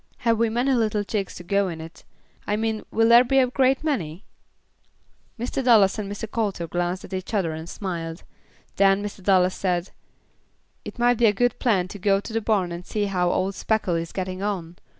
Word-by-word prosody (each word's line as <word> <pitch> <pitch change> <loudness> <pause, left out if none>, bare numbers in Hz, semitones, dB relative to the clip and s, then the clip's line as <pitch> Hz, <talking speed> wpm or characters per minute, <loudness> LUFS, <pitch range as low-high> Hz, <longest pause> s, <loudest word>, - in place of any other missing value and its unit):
"Have 230 -1 +3
we 230 -1 +3
many 245 +4 +1
little 215 -4 +1
chicks 200 -2 -3
to 175 - -9
go 200 +2 +1
in 165 -3 -5
it. 160 +1 -11 0.4
I 205 - +1
mean 220 0 -2
will 225 0 +2
there 235 +1 +8
be 270 +2 +1
a 265 - +6
great 260 +2 +1
many?" 190 - -2 1.1
Mr. 250 +3 -2
Dallas 220 -5 +5
and 200 -1 -4
Mr. 205 +2 -4
Coulter 210 -6 -2
glanced 175 +2 -2
at - - -11
each 185 +3 -4
other 180 -6 +1
and 160 +2 -7
smiled; 170 -4 -5 0.5
then 195 +1 +4
Mr. 205 -1 -6
Dallas 185 -1 +3
said, 180 -1 -2 0.9
"It - - -9
might 240 -1 +2
be 235 - +5
a - - +5
good 245 +4 0
plan 200 -8 +2
to 205 - -8
go 195 0 +2
to 220 - -8
the 225 - 0
barn 200 -5 0
and 170 +1 -6
see 205 +3 -2
how 180 -3 0
old 190 +2 0
Speckle 210 -1 0
is 165 0 -2
getting 185 0 -4
on. 180 -4 -3
200 Hz, 205 wpm, -24 LUFS, 180-225 Hz, 1.1 s, there